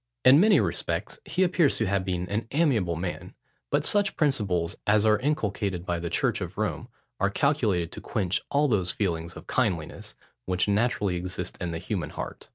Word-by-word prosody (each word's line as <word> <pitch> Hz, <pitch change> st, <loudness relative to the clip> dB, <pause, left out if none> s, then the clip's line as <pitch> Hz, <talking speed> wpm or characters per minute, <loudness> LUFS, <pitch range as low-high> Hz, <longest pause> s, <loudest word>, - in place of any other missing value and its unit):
In 130 Hz, +3 st, +8 dB
many 215 Hz, +4 st, +6 dB
respects, -, -, -2 dB
he 185 Hz, -, +1 dB
appears 175 Hz, -5 st, +3 dB
to 110 Hz, -, +1 dB
have 100 Hz, -1 st, 0 dB
been 90 Hz, -1 st, -2 dB
an 105 Hz, +4 st, -2 dB
amiable 120 Hz, -, +2 dB
man: 90 Hz, +2 st, -5 dB, 0.3 s
but -, -, +1 dB
such 205 Hz, -1 st, +1 dB
principles 100 Hz, -, 0 dB
as 105 Hz, 0 st, +4 dB
are 110 Hz, -1 st, +4 dB
inculcated 105 Hz, -, -1 dB
by 85 Hz, -2 st, -1 dB
the 85 Hz, 0 st, -4 dB
church -, -, 0 dB
of -, -, -6 dB
Rome, -, -, -2 dB, 0.3 s
are 100 Hz, -, +2 dB
calculated 105 Hz, -, +1 dB
to -, -, -8 dB
quench 95 Hz, -4 st, -1 dB
all 145 Hz, +1 st, +2 dB
those 100 Hz, -8 st, +1 dB
feelings 85 Hz, -4 st, -2 dB
of -, -, -10 dB
kindliness, 95 Hz, -11 st, -2 dB, 0.3 s
which 90 Hz, +1 st, +1 dB
naturally 105 Hz, -3 st, +1 dB
exist 90 Hz, +1 st, -4 dB
in 90 Hz, -, -2 dB
the 85 Hz, -, -3 dB
human 90 Hz, +2 st, -3 dB
heart. -, -, -7 dB
100 Hz, 180 wpm, -27 LUFS, 90-130 Hz, 0.3 s, In